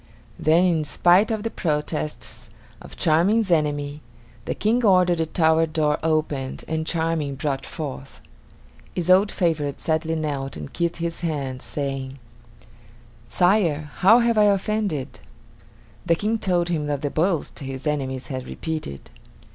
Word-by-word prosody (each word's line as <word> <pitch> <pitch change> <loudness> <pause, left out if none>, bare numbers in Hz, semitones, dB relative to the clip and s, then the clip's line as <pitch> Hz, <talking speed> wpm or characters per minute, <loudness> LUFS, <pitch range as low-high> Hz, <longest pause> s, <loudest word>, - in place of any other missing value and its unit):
Then, 165 +4 +4
in 165 -4 +2
spite 175 +7 +4
of 220 -2 -2
the 225 - -2
protests 150 -4 -3 0.3
of - - -12
Charming's 185 +6 +2
enemies, 145 -2 0 0.5
the - - -2
King 235 +4 +1
ordered 180 -4 +4
the 160 - 0
tower 160 0 +3
door 155 -1 0
opened 155 -4 -1
and 160 0 -2
Charming 160 -4 -1
brought 140 -1 -3
forth. 140 -4 -7 0.8
His 180 0 +1
old 195 +3 +5
favorite 155 -6 -1
sadly 160 0 0
knelt 145 - -3
and 75 -2 -8
kissed 170 0 -1
his 170 0 -3
hand, 140 -6 -3
saying: 135 -2 -4 1.1
"Sire, 170 -6 +2
how 210 +6 +6
have 235 -2 +3
I 210 - +6
offended?" 200 -7 0 0.9
The 170 - +4
King 215 +5 -1
told 175 -4 +1
him 150 -4 -1
of 145 -1 -1
the 145 - -2
boast 165 -1 0
his 135 0 -6
enemies 135 -3 -2
had 130 -3 -5
repeated. 155 - -6
160 Hz, 140 wpm, -23 LUFS, 145-180 Hz, 1.1 s, how